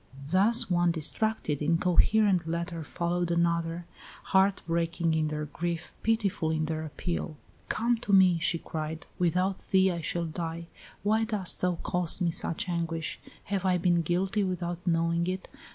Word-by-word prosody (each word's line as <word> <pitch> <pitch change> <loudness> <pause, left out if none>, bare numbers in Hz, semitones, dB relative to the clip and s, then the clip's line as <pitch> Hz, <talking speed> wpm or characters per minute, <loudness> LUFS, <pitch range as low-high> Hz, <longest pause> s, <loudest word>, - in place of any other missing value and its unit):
Thus 225 +6 +3
one 175 -1 +2
distracted, 165 -1 -1
incoherent 180 +3 +3
letter 170 0 -3
followed 175 +2 -1
another, 170 0 0 0.4
heart 190 0 +3
breaking 165 0 0
in 160 -1 +1
their 150 0 -3
grief, 170 +3 -4
pitiful 210 -7 +1
in 160 0 0
their 160 0 -3
appeal. 155 +1 -4 0.3
"Come 235 +1 +1
to 215 -3 -4
me," 185 -3 +6
she 165 +1 +1
cried; 160 0 -5
"without 180 +2 +1
thee 190 0 +4
I 170 -1 -3
shall 170 +2 -2
die. 165 +1 -4 0.4
Why 215 +2 +2
dost 210 -5 -1
thou 180 -1 +2
cause 180 -1 +1
me 175 -3 +1
such 165 +1 -3
anguish? 165 -2 -2 0.2
Have 195 -2 -2
I 185 -1 +3
been 175 -1 +2
guilty 185 +5 0
without 175 -1 -3
knowing 170 0 +1
it? 185 0 -3
175 Hz, 150 wpm, -29 LUFS, 165-190 Hz, 0.4 s, me